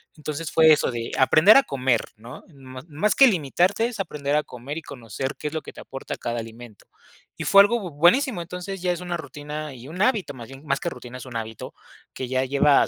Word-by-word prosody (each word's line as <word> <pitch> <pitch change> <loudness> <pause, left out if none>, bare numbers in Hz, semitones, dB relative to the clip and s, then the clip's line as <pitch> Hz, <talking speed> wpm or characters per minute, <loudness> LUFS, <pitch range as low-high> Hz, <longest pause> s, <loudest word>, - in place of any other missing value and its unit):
Entonces, 155 +1 -5
fue 160 -1 +6
eso 145 - +1
de 115 -1 -5
aprender 155 - +6
a 275 - +6
comer, 130 - 0
¿no? 115 +3 -11
Más 140 +8 -3
que 275 - +8
limitarte, 185 - +1
es 235 -4 -8
aprender 150 -5 -2
a 150 - +2
comer 125 +5 -8
y 165 - -6
conocer 130 +3 -6
qué 150 - -4
es 150 - -5
lo 160 - -2
que - - -10
te - - -11
aporta 135 0 -7
cada 120 0 -3
alimento. 115 -1 -11 0.5
Y - - -5
fue 200 - +8
algo 205 -3 -1
buenísimo, 175 - +3
entonces, 180 +2 -7
ya 180 - +1
es 175 0 -4
una 175 -1 -3
rutina 150 -1 -7
y 125 +2 -11
un 175 +5 -6
hábito, 210 - +1
más 120 0 -10
bien, 135 +1 -12
más 140 0 +1
que 170 - -2
rutina, 125 +1 -9
es 125 - -9
un 125 -2 -10
hábito 110 -1 -7 0.4
que 130 - -5
ya 130 +1 0
lleva 140 +1 +4
150 Hz, 225 wpm, -24 LUFS, 130-175 Hz, 0.5 s, que